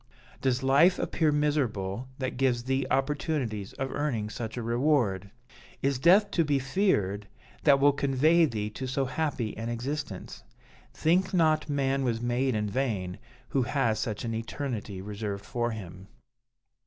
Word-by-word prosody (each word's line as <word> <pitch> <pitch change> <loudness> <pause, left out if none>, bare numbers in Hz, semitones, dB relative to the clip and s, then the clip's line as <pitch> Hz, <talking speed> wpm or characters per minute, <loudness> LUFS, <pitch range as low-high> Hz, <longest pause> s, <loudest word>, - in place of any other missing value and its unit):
Does 130 -1 +1
life 145 +8 +5
appear 160 -2 +1
miserable, 130 -8 0
that 130 -1 -3
gives 125 -2 +1
thee 130 +1 0
opportunities 135 - -1
of 135 0 -4
earning 115 -8 -2
such 115 -2 -5
a 120 - -3
reward? 115 -6 +1 0.5
Is 135 -1 +1
death 195 +7 +5
to 170 - +2
be 145 -2 +1
feared, 130 - 0 0.4
that 140 -1 +6
will 145 +1 +6
convey 140 +5 +3
thee 105 -6 -3
to 130 +4 -5
so 135 +1 0
happy 130 -5 -2
an 115 +1 -4
existence? 120 -3 -5 0.5
Think 185 +4 +1
not 155 -3 +3
man 135 -1 +1
was 115 -3 0
made 120 +1 0
in 105 0 0
vain, 100 -6 -2 0.3
who 135 - +1
has 120 -4 +1
such 110 0 -3
an 115 - -2
eternity 115 -4 -4
reserved 100 -1 -5
for 120 -2 -1
him.' 95 -4 -8
130 Hz, 150 wpm, -28 LUFS, 110-145 Hz, 0.5 s, that